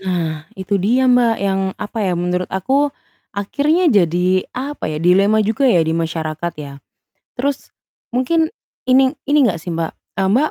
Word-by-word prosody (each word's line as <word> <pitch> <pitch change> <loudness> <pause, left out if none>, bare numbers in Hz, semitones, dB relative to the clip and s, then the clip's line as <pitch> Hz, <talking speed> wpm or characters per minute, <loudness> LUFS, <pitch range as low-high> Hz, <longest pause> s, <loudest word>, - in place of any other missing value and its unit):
Nah, 165 -4 -3
itu 195 +1 -1
dia 240 +7 +2
Mbak, 245 -2 +4
yang 195 -1 0 0.2
apa, 210 +2 -6
ya, 190 -4 0
menurut 180 +1 -1
aku, 265 +10 +1 0.5
akhirnya 295 - +1
jadi, 180 -1 +2
apa 280 - -4
ya, 155 - -3
dilema 200 +5 +4
juga, 225 +6 +2
ya, 175 -9 +4
di 160 - -1
masyarakat, 165 0 -3
ya. 145 -2 -7 0.7
Terus, 275 +2 -2 0.4
mungkin, 315 +7 +1 0.4
ini 260 0 +4
ini 295 +1 +4
enggak 175 -7 -1
sih 175 - -5
Mbak, 165 -1 -2 0.3
e - - +2
Mbak 255 +11 +2
195 Hz, 160 wpm, -18 LUFS, 175-255 Hz, 0.7 s, Mbak